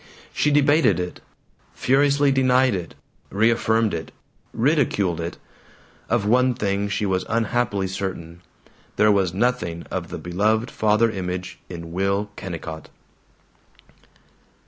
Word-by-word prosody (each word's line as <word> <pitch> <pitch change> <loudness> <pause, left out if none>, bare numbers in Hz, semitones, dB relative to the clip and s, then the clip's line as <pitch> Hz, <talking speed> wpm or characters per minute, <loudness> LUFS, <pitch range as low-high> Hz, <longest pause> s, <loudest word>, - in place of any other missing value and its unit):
She 150 - +2
debated 145 - +4
it, 90 0 -5 0.5
furiously 140 +1 +3
denied 130 -1 +3
it, 90 -5 -5 0.3
reaffirmed 110 +1 +2
it, 80 -1 -5 0.4
ridiculed 110 - +1
it. 85 +1 -5 0.7
Of 115 -4 +1
one 125 +3 +3
thing 100 -2 -1
she 100 +1 -1
was 95 -1 0
unhappily 115 -3 0
certain: 90 -3 -5 0.5
there 105 0 +4
was 95 -4 +2
nothing 95 -5 -1
of - - -3
the - - -5
beloved 110 +6 0
father 110 +1 +2
image 90 -2 -5
in 85 -2 -8
Will 100 +3 -1
Kennicott. 80 -4 -7
105 Hz, 115 wpm, -23 LUFS, 90-120 Hz, 0.7 s, debated